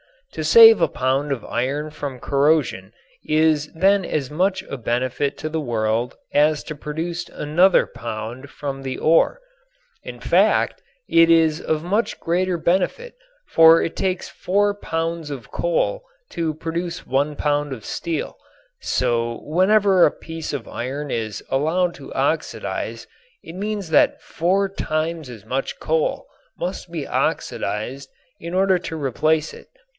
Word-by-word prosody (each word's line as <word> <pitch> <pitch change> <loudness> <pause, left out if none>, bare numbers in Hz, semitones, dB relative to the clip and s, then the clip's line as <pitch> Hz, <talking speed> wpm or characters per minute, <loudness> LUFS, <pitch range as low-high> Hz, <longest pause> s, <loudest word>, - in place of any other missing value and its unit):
To - - -5
save 455 -1 +8
a - - +5
pound 135 +3 -1
of 130 -5 -2
iron 140 +6 -2
from 145 -3 -6
corrosion 145 +4 +1 0.3
is 155 -1 +2
then 195 +3 +3
as 145 -5 -2
much 190 +4 0
a 140 - -6
benefit 130 +4 -1
to 155 - -3
the 160 +1 -2
world 115 -2 -1 0.2
as 150 +1 +3
to 155 - -7
produce 165 +4 -4
another 175 +6 +3
pound 115 +4 -7
from 135 -1 -5
the 130 -1 -4
ore. 165 - +3 0.6
In - - -8
fact - - +2 0.3
it 165 0 +5
is 160 -2 +4
of 155 0 -1
much 205 +7 -1
greater 180 +1 0
benefit, 190 - 0 0.4
for 165 0 +7
it 165 - -3
takes 185 -2 -2
four 205 +2 +1
pounds 165 -4 -3
of 140 -4 -8
coal - - 0 0.3
to 165 -2 -2
produce 170 +2 -4
one 145 +3 0
pound 145 -1 0
of 115 -5 -9
steel, 165 -3 -4 0.4
so 120 -2 -1
whenever 190 +3 +4
a - - +3
piece 160 -1 -7
of 135 -5 -4
iron 135 +5 -5
is 110 -3 -3
allowed 170 +6 +1
to - - -11
oxidize - - -2 0.4
it - - -10
means 200 -1 -4
that 160 - +3
four 190 +4 0
times 160 -4 -3
as 115 -5 -11
much 135 +1 -3
coal 160 0 0 0.3
must 180 0 -4
be 160 -4 -4
oxidized 130 +6 -2 0.3
in 170 +2 -6
order 190 -1 +3
to 160 - -6
replace 155 +2 0
it. - - -13
155 Hz, 145 wpm, -22 LUFS, 140-175 Hz, 0.6 s, save